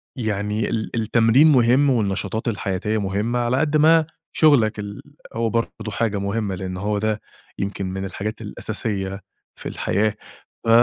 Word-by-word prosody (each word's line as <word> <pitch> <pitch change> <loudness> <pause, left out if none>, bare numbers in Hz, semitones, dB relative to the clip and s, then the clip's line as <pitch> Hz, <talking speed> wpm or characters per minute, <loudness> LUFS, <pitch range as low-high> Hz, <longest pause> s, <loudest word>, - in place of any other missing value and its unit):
يعني 105 -3 -1
ال 110 -1 -2
التمرين 115 +6 +4
مُهِم 130 +2 +4
والنشاطات 105 -2 -1
الحياتية 105 0 -1
مهمّة، 105 +5 -1
على 120 +1 +1
قد 155 +1 +2
ما 160 +1 +5 0.3
شُغلك 115 -9 +4
ال 100 0 -6 0.3
هو 115 0 0
برضه 115 -1 -2
حاجة 110 -2 0
مهمّة، 100 0 -2
لأن 90 0 -5
هو 105 +2 -1
ده 110 0 -1 0.4
يمكن 100 0 -3
من 95 +1 -4
الحاجات 105 +3 -5
الأساسية 95 -2 -4 0.3
في - - -6
الحياة، 110 +1 0 0.5
ف - - +2
110 Hz, 145 wpm, -22 LUFS, 100-115 Hz, 0.5 s, ما